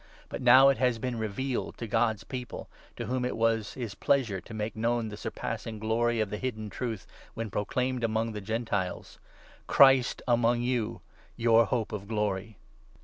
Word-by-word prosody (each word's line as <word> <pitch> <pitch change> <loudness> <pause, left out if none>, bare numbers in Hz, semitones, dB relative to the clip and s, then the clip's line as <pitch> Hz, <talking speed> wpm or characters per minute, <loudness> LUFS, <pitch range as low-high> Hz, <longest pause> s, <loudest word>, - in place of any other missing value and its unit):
But - - -5
now 130 +2 +8
it 135 - +1
has 125 -2 +2
been 120 0 -3
revealed 120 +5 -3
to 115 - -5
God's 110 -2 +1
People, 125 +3 -6 0.3
to 120 - -5
whom 125 +2 -1
il 125 - -1
was 115 -1 +1
his 115 -6 -5
pleasure 115 -9 +1
to - - -15
make 110 0 -4
known 115 0 0
the 105 - -7
surpassing 110 +1 -5
glory 115 +2 0
of 105 -3 -1
that 105 - -3
hidden 110 -5 -4
Truth 115 -6 -4 0.3
when 115 -2 -4
proclaimed 125 +5 -1
among 115 0 0
the 105 -1 -6
Gentiles 105 -3 -3 0.5
'Christ 135 -2 +5
among 120 0 +3
you! 120 -6 -1 0.4
Your 115 -1 +5
Hope 115 -4 -1
of 100 -2 -5
glory!' 105 -1 -2
115 Hz, 170 wpm, -29 LUFS, 110-125 Hz, 0.5 s, now